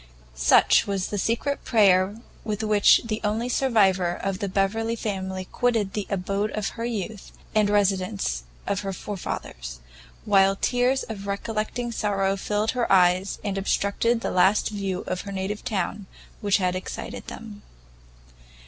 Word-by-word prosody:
Such -, -, +4 dB
was 195 Hz, -2 st, -1 dB
the 205 Hz, -, -2 dB
secret 235 Hz, +7 st, -1 dB
prayer 200 Hz, -2 st, +3 dB, 0.2 s
with 215 Hz, 0 st, -3 dB
which 210 Hz, -2 st, +5 dB
the 215 Hz, -1 st, -3 dB
only 215 Hz, +3 st, 0 dB
survivor 195 Hz, -9 st, +2 dB
of 195 Hz, -1 st, -3 dB
the 200 Hz, -, -2 dB
Beverley 220 Hz, +4 st, 0 dB
family 190 Hz, -4 st, -4 dB
quitted 225 Hz, -5 st, 0 dB
the 210 Hz, -2 st, -3 dB
abode 200 Hz, +2 st, -1 dB
of 215 Hz, -2 st, -1 dB
her 230 Hz, -, -5 dB
youth, 220 Hz, -3 st, -5 dB, 0.2 s
and 215 Hz, -2 st, +3 dB
residence 195 Hz, -, +1 dB, 0.2 s
of 200 Hz, -, -1 dB
her 195 Hz, -1 st, -4 dB
forefathers; -, -, -6 dB, 0.5 s
while 195 Hz, -1 st, +4 dB
tears 250 Hz, +5 st, +1 dB
of 200 Hz, -3 st, -7 dB
recollecting 220 Hz, +4 st, -3 dB
sorrow 195 Hz, -3 st, 0 dB
filled 210 Hz, +2 st, -1 dB
her 245 Hz, -2 st, -1 dB
eyes, 185 Hz, +1 st, +4 dB
and 200 Hz, -2 st, -2 dB
obstructed 205 Hz, +4 st, +1 dB
the -, -, -2 dB
last 190 Hz, +3 st, +3 dB
view 195 Hz, -3 st, -3 dB
of 185 Hz, 0 st, -3 dB
her 200 Hz, -, -7 dB
native 195 Hz, +2 st, -3 dB
town 200 Hz, -3 st, -3 dB, 0.3 s
which 205 Hz, -2 st, +3 dB
had 185 Hz, -1 st, 0 dB
excited 185 Hz, -, -6 dB
them. 210 Hz, -2 st, -9 dB
200 Hz, 150 wpm, -25 LUFS, 190-220 Hz, 0.5 s, which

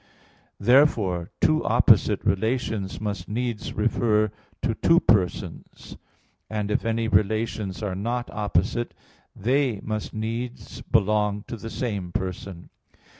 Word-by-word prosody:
Therefore 110 Hz, -, +3 dB
two -, -, +3 dB
opposite -, -, +4 dB
relations 105 Hz, 0 st, -1 dB
must 100 Hz, -4 st, -4 dB
needs 120 Hz, 0 st, -3 dB
refer 110 Hz, -1 st, +2 dB, 0.3 s
to 115 Hz, -, +1 dB
two 165 Hz, +9 st, +4 dB
persons: 100 Hz, -, -1 dB, 0.5 s
and 105 Hz, -1 st, -2 dB
if -, -, +1 dB
any 115 Hz, 0 st, 0 dB
relations 110 Hz, -2 st, 0 dB
are 100 Hz, -3 st, -2 dB
not 120 Hz, +6 st, -2 dB
opposite 105 Hz, +3 st, -1 dB, 0.4 s
they 125 Hz, 0 st, +1 dB
must 110 Hz, -1 st, -3 dB
needs 115 Hz, +3 st, -5 dB
belong 105 Hz, -3 st, +1 dB
to -, -, -5 dB
the 115 Hz, 0 st, -7 dB
same 100 Hz, -8 st, -3 dB
person. 90 Hz, 0 st, -5 dB
110 Hz, 115 wpm, -25 LUFS, 100-115 Hz, 0.5 s, opposite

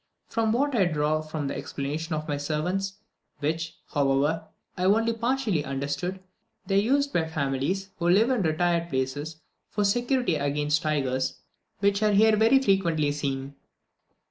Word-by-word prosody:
From 225 Hz, -1 st, 0 dB
what 280 Hz, +5 st, +1 dB
I 205 Hz, -6 st, +3 dB
could 170 Hz, -, -3 dB
draw 150 Hz, +1 st, +1 dB
from 155 Hz, -1 st, -4 dB
the -, -, -3 dB
explanations 150 Hz, +4 st, -4 dB
of 155 Hz, 0 st, -3 dB
my 145 Hz, -, -1 dB
servants, 175 Hz, +7 st, -2 dB, 0.4 s
which, 160 Hz, +2 st, -2 dB, 0.2 s
however, 145 Hz, +3 st, +1 dB, 0.3 s
I 180 Hz, -, -1 dB
only 225 Hz, +4 st, +3 dB
partially 230 Hz, -, 0 dB
understood, 140 Hz, +7 st, -3 dB, 0.5 s
they 195 Hz, +1 st, +3 dB
are -, -, +3 dB
used 280 Hz, +5 st, +1 dB
by 160 Hz, -1 st, +1 dB
families, 160 Hz, +6 st, -2 dB
who 170 Hz, 0 st, +1 dB
live 215 Hz, +8 st, +4 dB
in 250 Hz, -5 st, +1 dB
retired 170 Hz, +1 st, +1 dB
places, 140 Hz, +3 st, -2 dB, 0.3 s
for 210 Hz, -, -1 dB
security 245 Hz, -, +1 dB
against 145 Hz, +2 st, 0 dB
the 155 Hz, -, -1 dB
tigers, 130 Hz, -3 st, -1 dB, 0.4 s
which 200 Hz, 0 st, +2 dB
are 210 Hz, -1 st, +3 dB
here 215 Hz, +2 st, +5 dB
very 225 Hz, +5 st, +5 dB
frequently 170 Hz, -, +2 dB
seen. 140 Hz, -1 st, -3 dB
165 Hz, 160 wpm, -26 LUFS, 145-205 Hz, 0.5 s, here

